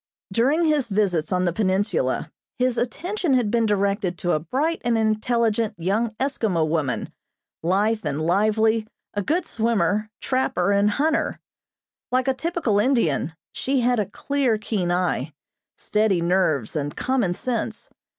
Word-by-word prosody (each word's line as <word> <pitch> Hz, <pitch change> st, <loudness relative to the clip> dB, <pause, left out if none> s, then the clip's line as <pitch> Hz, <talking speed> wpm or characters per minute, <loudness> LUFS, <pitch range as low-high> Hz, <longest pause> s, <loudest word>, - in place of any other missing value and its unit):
During 280 Hz, -, +3 dB
his 300 Hz, -5 st, +2 dB
visits 195 Hz, -7 st, 0 dB
on 185 Hz, 0 st, +1 dB
the 175 Hz, -, +1 dB
peninsula 205 Hz, -, 0 dB, 0.3 s
his 255 Hz, -1 st, +1 dB
attention 335 Hz, -, -1 dB
had 235 Hz, -5 st, +1 dB
been 230 Hz, -1 st, +2 dB
directed 200 Hz, -3 st, 0 dB
to 175 Hz, -, -1 dB
a 155 Hz, -, +2 dB
bright 275 Hz, -, -1 dB
and 235 Hz, -1 st, +2 dB
intelligent 220 Hz, 0 st, +1 dB
young 215 Hz, +6 st, -1 dB
Eskimo 215 Hz, -, 0 dB
woman, 150 Hz, -5 st, -1 dB, 0.5 s
lithe 205 Hz, +6 st, +1 dB
and 150 Hz, -2 st, -2 dB
lively, 215 Hz, +6 st, +2 dB, 0.3 s
a 205 Hz, -, -1 dB
good 330 Hz, -, 0 dB
swimmer, 215 Hz, -, 0 dB
trapper 200 Hz, -8 st, 0 dB
and 200 Hz, +1 st, +3 dB
hunter. 310 Hz, +8 st, 0 dB, 0.7 s
Like 255 Hz, +1 st, +1 dB
a 265 Hz, -, +3 dB
typical 260 Hz, -7 st, 0 dB
Indian, 205 Hz, -, +1 dB, 0.2 s
she 270 Hz, -1 st, 0 dB
had 245 Hz, -1 st, +2 dB
a 200 Hz, -2 st, -1 dB
clear, 270 Hz, -1 st, 0 dB
keen 205 Hz, -4 st, -2 dB
eye, 175 Hz, -5 st, 0 dB, 0.4 s
steady 210 Hz, -4 st, +1 dB
nerves 170 Hz, -, +1 dB
and 145 Hz, -1 st, -2 dB
common 245 Hz, -9 st, 0 dB
sense. 245 Hz, +3 st, -3 dB
215 Hz, 140 wpm, -23 LUFS, 180-250 Hz, 0.7 s, During